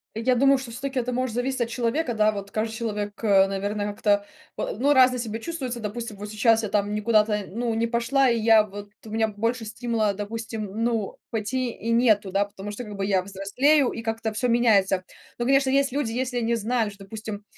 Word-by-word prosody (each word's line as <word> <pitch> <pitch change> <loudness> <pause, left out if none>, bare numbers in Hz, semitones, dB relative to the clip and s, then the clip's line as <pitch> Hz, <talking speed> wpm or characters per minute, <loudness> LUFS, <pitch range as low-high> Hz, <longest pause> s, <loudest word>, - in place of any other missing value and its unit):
Я 230 +3 +2
думаю, 275 +2 +5
что 260 -3 -7
всё-таки 265 +3 -3
это 250 0 -2
может 250 -2 -2
зависеть 255 +1 -1
от 235 - 0
человека, 240 +2 -1
да, 215 0 +3
вот 200 -1 -6
каждый 220 +2 -2
человек, 210 -2 -3
э, 195 -3 +5
наверно, 205 +1 -2
как-то, 205 0 +1 0.3
а, - - -2
ну, 270 +7 +1
разное 255 -2 +5
себя 225 -2 -3
чувствуется. 260 -4 -4
Допустим, 220 0 -5
вот 205 +1 -7
сейчас 225 +1 +3
я 215 - -2
там 205 0 0
никуда-то, 210 -1 +2
ну, 235 +3 -2
не 230 +1 +1
пошла, 235 +4 +2
и 235 -2 +2
я 220 -1 +6
вот 205 0 -9 0.2
у - - -9
меня 220 0 +1
б 210 - -9
больше 230 +2 -1
стимула, 220 -1 -1
допустим, 220 +2 -5
н 220 +4 -3
ну, 230 -4 -1
пойти 245 +3 -2
и 230 0 -4
нету, 220 -4 +3
да, 200 +2 +2
потому 200 0 -8
что 210 +4 -6
как 210 -3 -8
бы 195 0 -2
я 195 -2 +2
взрослею 220 +9 +2
и 230 - -6
как-то 225 -1 -3
всё 235 +4 0
меняется. 205 -6 +3 0.3
Ну, 240 - -2
конечно, 275 +1 +3
есть 275 0 +2
люди, 275 -4 -1
если 250 +1 -2
они 235 0 +1
знают, 225 -1 0
что, 200 0 -13
допустим, 215 0 -7
225 Hz, 220 wpm, -25 LUFS, 205-245 Hz, 0.3 s, я